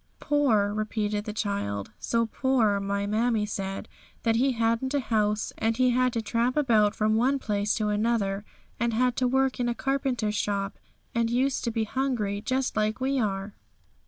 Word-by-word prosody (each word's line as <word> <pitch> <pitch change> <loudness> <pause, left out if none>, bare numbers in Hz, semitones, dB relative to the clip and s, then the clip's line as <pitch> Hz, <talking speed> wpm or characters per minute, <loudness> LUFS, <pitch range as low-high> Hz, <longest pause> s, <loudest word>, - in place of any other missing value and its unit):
'Poor,' 225 -9 +2
repeated 210 -1 -2
the 215 - -3
child; 200 - -3
'so 230 0 +1
poor, 225 -4 +1
my 200 0 -1
mammie 220 +1 +1
said, 195 -2 -4 0.4
that 225 -1 +2
He 265 +2 +2
hadn't 230 +4 0
a - - +3
house, 215 -4 0
and 225 0 +1
had 255 -1 +3
to 230 - -1
tramp 235 +5 0
about 220 -8 +3
from 215 0 +1
one 255 +5 +3
place 205 -4 0
to 215 -1 0
another, 205 -2 0 0.4
and 235 0 0
had 250 +1 +2
to 255 - +2
work 265 +1 +1
in 240 -1 +1
a 235 - -1
carpenter's 260 -6 -1
shop, 200 -1 -2 0.3
and 230 -1 +1
used 260 +3 +1
to - - +1
be 225 -1 0
hungry 220 -4 -1
just 260 +3 -1
like 215 +2 0
we 265 +1 0
are.' 200 -2 -2
225 Hz, 175 wpm, -27 LUFS, 210-250 Hz, 0.4 s, a